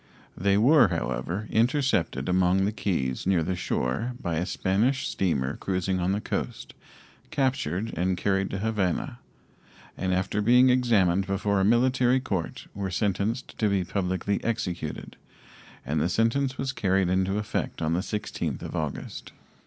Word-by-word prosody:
They 100 +2 +2
were, 135 +8 +6
however, 100 +5 -3
intercepted 120 - +1
among 90 +1 +3
the 105 - 0
keys 85 - -2
near 90 -4 +3
the 90 +3 -1
shore 90 - -2
by 85 -3 -2
a 90 +3 -1
Spanish 105 +9 +1
steamer 70 -8 -1
cruising 95 0 -1
on 90 +1 +1
the 100 - 0
coast, - - -4 0.6
captured 115 - -1
and 90 +2 0
carried 95 +1 0
to - - -3
Havana, 100 - -1 0.8
and 95 - -2
after 95 +3 0
being 125 +4 +6
examined 100 -7 +3
before 100 +1 0
a - - +2
military 125 +3 +3
court 95 -10 -4
were 100 -1 -3
sentenced 100 +6 -1
to 110 - +2
be 100 -2 +1
publicly 95 +1 -2
executed, 90 -9 -3 0.7
and 75 +1 0
the 85 - +1
sentence 125 +7 +1
was 135 0 -2
carried 95 -3 +1
into 95 +2 +1
effect 105 0 -3
on 80 0 0
the 85 - +1
16th 105 +2 -3
of - - -6
August. 75 -2 -5
95 Hz, 150 wpm, -26 LUFS, 90-115 Hz, 0.8 s, were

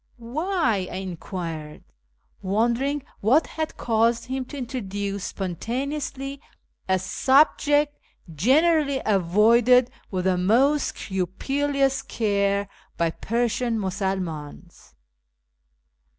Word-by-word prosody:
" - - -39 0.2
Why? 310 - +1
" - - -10
I - - -6
enquired, 170 -4 -6 0.6
wondering 235 +8 0 0.2
what 260 +10 +4
had 315 -1 -5
caused 230 +1 +1
him 260 +1 -3
to 285 - -9
introduce 200 -6 -4
spontaneously 270 - -4 0.5
a 190 - +4
subject 290 - +3 0.3
generally 280 - +3
avoided 220 +6 +4 0.2
with 185 -2 -2
the 185 -1 +2
most 260 +10 +2
scrupulous 270 +9 -1
care 200 -2 0 0.3
by 165 -1 +1
Persian 235 +3 -1
Musulmans. 180 - -4
230 Hz, 95 wpm, -24 LUFS, 190-275 Hz, 0.6 s, what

